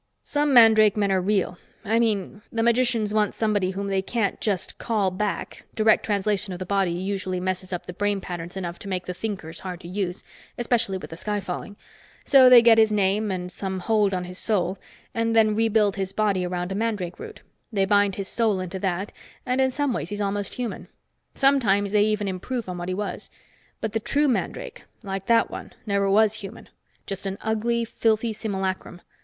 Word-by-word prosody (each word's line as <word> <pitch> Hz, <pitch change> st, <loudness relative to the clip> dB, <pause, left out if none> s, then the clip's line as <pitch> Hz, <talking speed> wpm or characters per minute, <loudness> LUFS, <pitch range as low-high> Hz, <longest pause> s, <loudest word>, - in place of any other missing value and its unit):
"Some 295 Hz, 0 st, 0 dB
mandrake 220 Hz, -4 st, +7 dB
men 200 Hz, -2 st, +1 dB
are 190 Hz, -1 st, +2 dB
real. 190 Hz, -2 st, 0 dB, 0.3 s
I 225 Hz, +2 st, +2 dB
mean, 210 Hz, -3 st, -1 dB
the 225 Hz, 0 st, 0 dB
magicians 235 Hz, -3 st, +2 dB
want 210 Hz, -1 st, +1 dB
somebody 210 Hz, -4 st, +1 dB
whom 195 Hz, +1 st, -4 dB
they 195 Hz, -1 st, 0 dB
can't 205 Hz, 0 st, -2 dB
just 200 Hz, -4 st, -2 dB
call 210 Hz, -5 st, 0 dB
back 205 Hz, +2 st, -3 dB
direct 220 Hz, -1 st, +4 dB
translation 205 Hz, -1 st, 0 dB
of -, -, -5 dB
the 185 Hz, -, -5 dB
body 195 Hz, -1 st, +1 dB
usually 185 Hz, +1 st, -3 dB
messes 185 Hz, 0 st, -3 dB
up 180 Hz, -, -4 dB
the 180 Hz, -, -7 dB
brain 205 Hz, +1 st, 0 dB
patterns 175 Hz, 0 st, -7 dB
enough 175 Hz, -2 st, -5 dB
to -, -, -9 dB
make 185 Hz, -2 st, -3 dB
the 180 Hz, -, -4 dB
thinkers 185 Hz, -5 st, -5 dB
hard 180 Hz, -2 st, -6 dB
to 170 Hz, -, -10 dB
use, 185 Hz, 0 st, -3 dB, 0.3 s
especially 235 Hz, -5 st, +1 dB
with 185 Hz, -, -9 dB
the 165 Hz, -, -7 dB
sky 210 Hz, +3 st, -2 dB
falling. 195 Hz, +2 st, -6 dB, 0.5 s
So 265 Hz, -2 st, +7 dB
they 245 Hz, -2 st, +9 dB
get 230 Hz, -1 st, +7 dB
his 220 Hz, -1 st, +5 dB
name 205 Hz, +1 st, +1 dB
and 180 Hz, -1 st, -3 dB
some 190 Hz, -1 st, -4 dB
hold 210 Hz, +1 st, +2 dB
on 180 Hz, -, -2 dB
his 180 Hz, +1 st, -5 dB
soul 195 Hz, -3 st, 0 dB, 0.3 s
and 230 Hz, 0 st, 0 dB
then 215 Hz, -1 st, +5 dB
rebuild 220 Hz, -2 st, +2 dB
his 190 Hz, 0 st, -3 dB
body 200 Hz, -4 st, +1 dB
around 180 Hz, +1 st, -3 dB
a -, -, -2 dB
mandrake 205 Hz, -5 st, -2 dB
root. 450 Hz, -1 st, -9 dB, 0.3 s
They 195 Hz, -3 st, +1 dB
bind 205 Hz, -1 st, +3 dB
his 195 Hz, -1 st, -4 dB
soul 220 Hz, -4 st, +1 dB
into 185 Hz, +1 st, -5 dB
that, 190 Hz, +1 st, -2 dB, 0.3 s
and 255 Hz, +1 st, +1 dB
in 265 Hz, -, +3 dB
some 285 Hz, 0 st, -1 dB
ways -, -, -3 dB
he's 205 Hz, 0 st, -4 dB
almost 205 Hz, 0 st, -2 dB
human. 245 Hz, -3 st, -5 dB, 0.5 s
Sometimes 215 Hz, -8 st, +3 dB
they 210 Hz, 0 st, +4 dB
even 210 Hz, -1 st, 0 dB
improve 215 Hz, +5 st, -4 dB
on 180 Hz, -1 st, -5 dB
what 175 Hz, +1 st, -4 dB
he 185 Hz, -, -1 dB
was. 200 Hz, -2 st, -4 dB, 0.5 s
But 220 Hz, -, -2 dB
the 225 Hz, -, +1 dB
true 290 Hz, +7 st, +1 dB
mandrake 455 Hz, -, -3 dB, 0.2 s
like 195 Hz, -1 st, -5 dB
that 230 Hz, -1 st, +3 dB
one -, -, -8 dB
never 200 Hz, -2 st, +1 dB
was 215 Hz, +1 st, +4 dB
human. 200 Hz, +3 st, -10 dB, 0.4 s
Just 195 Hz, 0 st, -5 dB
an 195 Hz, 0 st, -4 dB
ugly, 230 Hz, +2 st, 0 dB
filthy 225 Hz, 0 st, 0 dB
simulacrum. 190 Hz, -4 st, -4 dB
205 Hz, 200 wpm, -24 LUFS, 190-225 Hz, 0.5 s, they